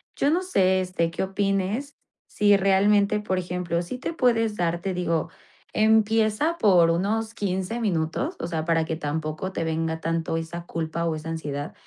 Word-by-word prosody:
yo 280 - +2
no 345 +4 +2
sé, 190 - +2
este, 180 -2 -1
qué - - -2
opines 195 +7 -1 0.3
si 205 -1 +4
realmente 200 +2 +3
por 190 -3 -1
ejemplo 175 -1 -2
si 175 +9 -6
te 255 - -4
puedes 225 -7 +2
dar 170 0 0
te 190 0 -2
digo, 170 -2 -1 0.4
empieza 220 +7 +2
por 180 - +5
unos 220 +6 -1
15 195 +2 -2
minutos 165 -7 -1
o - - -3
sea 160 -2 -3
para 165 -1 +2
que 160 0 -3
tampoco 155 +4 -3
te 165 - -2
venga 160 0 -2
tanto 165 0 -1
esa 170 +1 -5
culpa 165 0 -3
o 165 - 0
esa 155 +1 -6
ansiedad. 145 -2 -4
185 Hz, 170 wpm, -25 LUFS, 165-210 Hz, 0.4 s, por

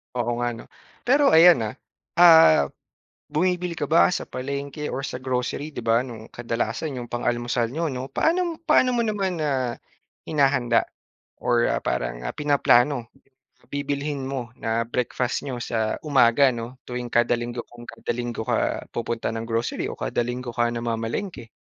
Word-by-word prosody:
Oo 120 -1 0
nga 120 0 0
'no. - - -11 0.4
Pero 275 - +4
ayan 165 -3 +8
ah, 105 - -6 0.4
ah 160 - +7 0.6
bumibili 180 +3 0
ka 145 - -1
ba 165 +3 +5
sa 180 - -2
palengke 140 +3 -5
or 135 - -3
sa - - -5
grocery, 130 +3 -2
'di - - -5
ba 115 +1 +3
no'ng 115 -3 -10
kadalasan 120 +4 -3
'yong 120 -1 -6
pang-almusal 120 -1 -1
n'yo 160 +4 -2
'no? 130 0 -5
Paano 340 0 +1
paano 280 -6 +3
mo 240 - +1
naman 200 -5 -1
na 130 -5 -1 0.5
hinahanda 135 -6 +2 0.6
or 120 -1 +2
ah, - - 0
parang - - -2
ah - - -3
pinaplano? 140 -4 +2 0.6
Bibilhin 145 0 -3
mo 130 -3 -4
na 115 +1 -1
breakfast 125 +1 -2
n'yo 130 -4 -4
sa 110 -2 -1
umaga 135 -2 +5
'no 120 +1 -6
tuwing 125 -1 -5
kada 120 0 +3
linggo, 120 0 -4
kung 120 0 -13
kada - - -4
linggo 120 -2 -4
ka - - 0
pupunta 115 -1 -3
ng 115 0 -4
grocery 115 0 -1
o - - -8
kada - - -1
linggo 125 0 -4
ka 120 0 +2
namamalengke? 115 - -3
125 Hz, 160 wpm, -24 LUFS, 120-150 Hz, 0.6 s, ayan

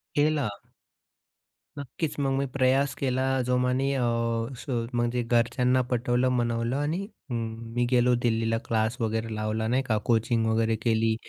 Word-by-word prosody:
केला. 145 -4 +2 1.3
नक्कीच, 145 +3 -4
मग 135 -1 +1
मी 140 - 0
प्रयास 135 +1 +2
केला 130 -1 0 0.2
जोमाने 125 +1 +1
अ, 130 - 0 0.6
स - - -10 0.3
म्हणजे 120 +1 0
घरच्यांना 125 +2 +2
पटवलं, 125 +1 +1
मनवलं 120 0 0
आणि 150 +5 -1 0.3
अं, 120 - -2 0.4
मी 120 0 +2
गेलो 125 0 +4
दिल्लीला. 115 -1 +1
क्लास 110 +2 0
वगैरे 110 0 -1
लावला 110 +1 -1
नाही 130 +3 +1
का, 110 -4 0
कोचिंग 115 0 +2
वगैरे 110 0 +2
केली. 110 -1 +2
120 Hz, 140 wpm, -27 LUFS, 115-130 Hz, 1.3 s, गेलो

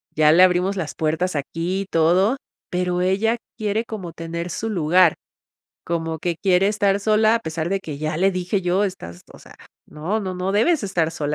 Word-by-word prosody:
Ya 155 0 +5
le 175 +3 +6
abrimos 185 +2 +3
las 160 -4 -4
puertas 160 +2 -1
aquí 170 +6 -2
y - - -4
todo. 185 +9 +2 0.3
Pero, 180 0 -1
ella 205 +6 +1 0.2
quiere 215 +1 -1
como 185 -8 -7
tener 170 +1 -5
su 225 +7 -3
lugar, 175 -2 +4 0.7
como 165 -1 -3
que 170 +1 -2
quiere 190 +1 +2
estar 200 -1 +1
sola, 215 +2 +3
a - - -1
pesar 160 -1 -4
de 195 0 0
que 150 -6 -7
ya 155 0 -2
le 195 +2 +3
dije 185 +2 -1
yo: 180 +3 +1
·"Estás, 85 - -6
o - - -14
sea, - - -16 0.3
no, 180 +9 -3
no, 185 -2 -4
no 185 +2 -2
debes 270 +7 +2
estar 175 -5 0
sola 150 -2 -3
180 Hz, 195 wpm, -22 LUFS, 165-200 Hz, 0.7 s, le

